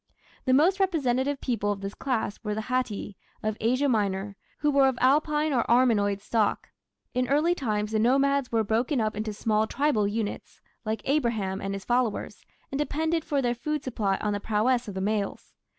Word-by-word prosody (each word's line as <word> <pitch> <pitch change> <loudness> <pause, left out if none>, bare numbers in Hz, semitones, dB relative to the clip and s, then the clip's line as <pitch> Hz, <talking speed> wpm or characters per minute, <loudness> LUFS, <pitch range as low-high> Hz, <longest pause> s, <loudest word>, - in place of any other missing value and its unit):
The 260 - +3
most 345 +8 +4
representative 285 -7 +1
people 215 -5 0
of 200 -1 -4
this 195 +1 -5
class 235 -6 -2
were 210 -1 -2
the 220 - -3
"Hatti" 225 -5 -2 0.3
of 215 0 -1
Asia 255 +6 +2
Minor, 200 -4 0 0.2
who 295 0 +1
were 275 -1 +5
of 260 -2 0
Alpine 300 +3 +2
or 240 -3 +2
Armenoid 215 -5 +3
stock. 215 0 0 0.4
In 250 0 0
early 300 +6 +3
times 215 -9 -2
the 220 - +1
nomads 275 +3 +2
were 225 -1 +2
broken 235 +6 0
up 215 -1 0
into 215 +1 -3
small 215 +1 0
tribal 275 -8 +1
units, 210 0 -4 0.3
like 220 +1 -2
Abraham 230 -9 0
and 195 0 -3
his 195 - -7
followers, 240 -3 -1 0.3
and 275 - -2
depended 320 +2 0
for 290 -4 -1
their 240 -1 +1
food 295 +4 -3
supply 205 -6 -1
on 210 -1 0
the 205 - -2
prowess 230 +4 +1
of 200 - -6
the 190 - -2
males. 205 0 -2
235 Hz, 185 wpm, -27 LUFS, 210-275 Hz, 0.4 s, were